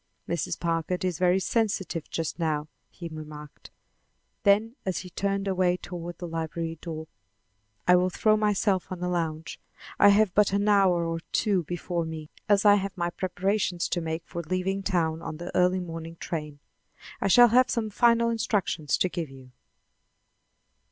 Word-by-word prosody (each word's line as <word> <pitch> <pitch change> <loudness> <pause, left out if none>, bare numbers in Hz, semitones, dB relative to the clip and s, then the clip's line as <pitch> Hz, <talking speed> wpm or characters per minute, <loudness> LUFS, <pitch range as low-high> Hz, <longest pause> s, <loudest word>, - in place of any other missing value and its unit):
"Mrs. 170 - -2
Packard 170 +2 -1
is 180 -4 -2
very 180 +1 +3
sensitive 190 -5 -1
just 165 +1 -3
now," 155 -2 -1 0.2
he 170 - -8
remarked. 150 -2 -10 0.7
Then 215 +4 +3
as 190 -2 -2
he 180 - -10
turned 195 +1 -1
away 185 -2 +2
toward 175 -1 -7
the 175 - -6
library 165 0 -4
door: 160 -2 -6 0.8
"I 180 - +7
will 180 +1 +2
throw 215 +3 +3
myself 205 -3 +1
on 180 -1 -5
a - - 0
lounge. 165 -2 -3 0.4
I 205 - +8
have 200 -2 +4
but 205 -2 +3
an 200 +1 +1
hour 190 -4 +4
or 165 0 -2
two 190 -6 +1
before 175 +1 -3
me, 160 -1 -7 0.2
as 205 0 +4
I 205 0 +7
have 195 0 -4
my 175 0 -1
preparations 185 0 -1
to 175 - -1
make 160 0 -3
for 170 - -5
leaving 185 +4 -2
town 165 -4 0
on 155 - -6
the 175 +2 -7
early 180 +1 +3
morning 165 -2 -7
train. 150 -3 -5 0.6
I - - +1
shall 240 +5 +7
have 250 +3 +4
some 220 -3 -1
final 235 +1 +3
instructions 200 - 0
to - - +2
give 170 -4 -4
you." 130 -1 -14
180 Hz, 165 wpm, -27 LUFS, 165-200 Hz, 0.8 s, I